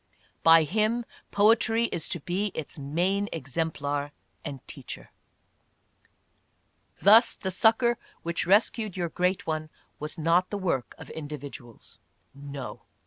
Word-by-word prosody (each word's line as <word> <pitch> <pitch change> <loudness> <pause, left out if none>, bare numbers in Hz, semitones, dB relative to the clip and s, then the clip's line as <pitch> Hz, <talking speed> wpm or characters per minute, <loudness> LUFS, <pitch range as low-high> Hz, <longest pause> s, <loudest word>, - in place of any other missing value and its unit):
By 165 0 +7
him, 215 +8 0 0.2
poetry 225 +2 +4
is 165 - -3
to 175 - -2
be 185 +7 -1
its 155 - -6
main 180 +8 -1
exemplar 145 -1 -2 0.3
and 140 -4 -7
teacher. - - -9 1.9
Thus 220 +4 +7
the 190 - -4
succor 230 +4 +3 0.2
which 170 +1 0
rescued 210 0 +2
your 175 -2 -1
great 180 +3 0
one 155 -1 -3 0.3
was 150 +3 -4
not 170 +3 +2
the 205 - -3
work 165 -10 -2
of - - -11
individuals, 145 -5 -9 0.3
no 140 -1 -8
170 Hz, 120 wpm, -27 LUFS, 145-205 Hz, 1.9 s, By